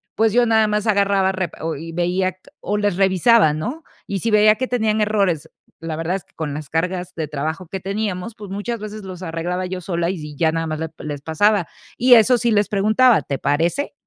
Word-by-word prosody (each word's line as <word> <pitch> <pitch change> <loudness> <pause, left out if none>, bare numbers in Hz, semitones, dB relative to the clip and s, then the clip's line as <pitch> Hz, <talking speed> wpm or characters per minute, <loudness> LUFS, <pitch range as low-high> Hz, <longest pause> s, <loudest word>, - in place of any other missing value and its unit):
pues, 220 -1 +2
yo 245 0 +4
nada 220 -1 +3
más 210 +1 -1
agarraba, 200 -2 +2
repe 185 -3 -4 0.2
y, 165 +3 -7
o - - -10
veía 180 +2 0
q 185 - -35 0.2
o 210 - -2
les 205 -3 0
revisaba, 195 -2 +4
¿no? 245 - -4 0.2
Y 195 - -3
si 230 +4 -1
veía 215 0 +6
que 255 +4 -2
tenían 220 -3 0
errores, 195 -7 0 0.3
la 165 -1 -4
verdad 165 +4 -1
es 195 - -14
que - - -34
con 150 -3 -4
las 150 0 -6
cargas 180 +2 -2
de 155 -3 -4
trabajo 155 +4 -4
que 190 - -3
teníamos, 200 +2 -3
pues, 205 -2 -10
muchas 205 +3 -4
veces 215 0 -7
los 185 -2 -8
arreglaba 175 +2 -3
yo 185 0 -4
sola 170 -1 -2
y, 190 - -3
si, 150 -2 -8
ya 160 +2 +2
nada 165 0 -2
más 155 -1 -3
les 160 0 -3
les 145 -2 -6
pasaba, 185 +5 +2 0.3
y 250 0 +7
eso 240 +2 +5
sí 235 +1 +1
les 205 -1 +2
preguntaba, 215 +4 +3
¿te 140 - -4
parece? 170 - 0
190 Hz, 225 wpm, -20 LUFS, 165-215 Hz, 0.3 s, y